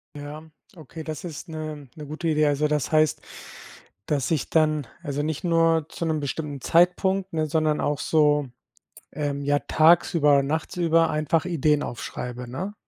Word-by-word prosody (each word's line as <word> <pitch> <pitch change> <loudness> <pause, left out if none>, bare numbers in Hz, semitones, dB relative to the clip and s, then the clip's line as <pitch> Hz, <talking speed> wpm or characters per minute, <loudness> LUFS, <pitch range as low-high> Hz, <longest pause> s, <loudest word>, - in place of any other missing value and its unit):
Ja, 150 +2 -9 0.3
okay, 160 +1 -9
das 155 +1 -6
ist 165 +1 -8
'ne 155 -3 -6
'ne 150 -1 -9
gute 160 +3 -3
Idee. 155 0 +3
Also, 145 +1 +1
das 150 -3 0
heißt, 155 -2 +3 0.8
dass 145 0 -1
ich 150 -6 0
dann 155 -4 +2 0.2
also 145 -2 -2
nicht 155 +1 -3
nur 165 -2 +2
zu 170 - -5
'nem 155 -2 -1
bestimmten 145 -1 -4
Zeitpunkt, 185 +2 +2
ne, 155 -1 0
sondern 155 -1 +1
auch 145 -3 -1
so, 150 -1 +2 0.7
ähm, 140 -1 -3
ja, 145 0 +2
tagsüber, 155 -3 +4
nachtsüber 165 +2 +1
einfach 155 +2 0
Ideen 150 -4 +1
aufschreibe, 125 +1 -6
ne? 190 +11 -5
155 Hz, 155 wpm, -24 LUFS, 145-165 Hz, 0.8 s, tagsüber